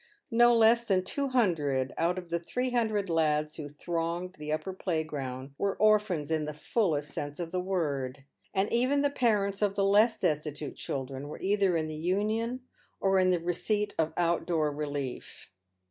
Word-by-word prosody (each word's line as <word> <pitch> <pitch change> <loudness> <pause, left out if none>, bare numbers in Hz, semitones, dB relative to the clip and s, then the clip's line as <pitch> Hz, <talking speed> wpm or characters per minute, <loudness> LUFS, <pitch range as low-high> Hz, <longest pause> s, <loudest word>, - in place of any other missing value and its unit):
No 240 +1 +6
less 230 +1 +5
than 190 -5 +1
two 280 +8 0
hundred 150 - +1
out 175 +2 +1
of 175 -2 -7
the 170 - +1
three 250 +9 -2
hundred 220 -4 +1
lads 155 -2 +1
who 150 -2 -6
thronged 170 +4 -3
the 150 0 -4
upper 155 +5 -2
playground 145 -7 -3
were 200 -1 0
orphans 210 -8 +2
in 155 -1 +1
the 150 0 -5
fullest 150 -5 0
sense 145 +1 -5
of 170 -1 -4
the 185 - -1
word, 145 -8 -2 0.3
and 195 +1 0
even 260 +4 +2
the 285 - +2
parents 210 -7 +1
of 200 -1 +1
the 195 - +2
less 210 +3 +4
destitute 150 -1 -2
children 135 +1 -5
were 150 - -8
either 195 -3 +2
in 155 -1 -1
the 155 - -5
Union 215 +9 -1 0.4
or 195 -1 +3
in 185 0 +4
the 180 -1 +2
re 175 +1 -1
ceipt 210 +3 -1
of 160 -1 +2
out 170 -1 +1
door 155 -4 +1
relief. 145 -7 -5
175 Hz, 180 wpm, -29 LUFS, 150-210 Hz, 0.4 s, No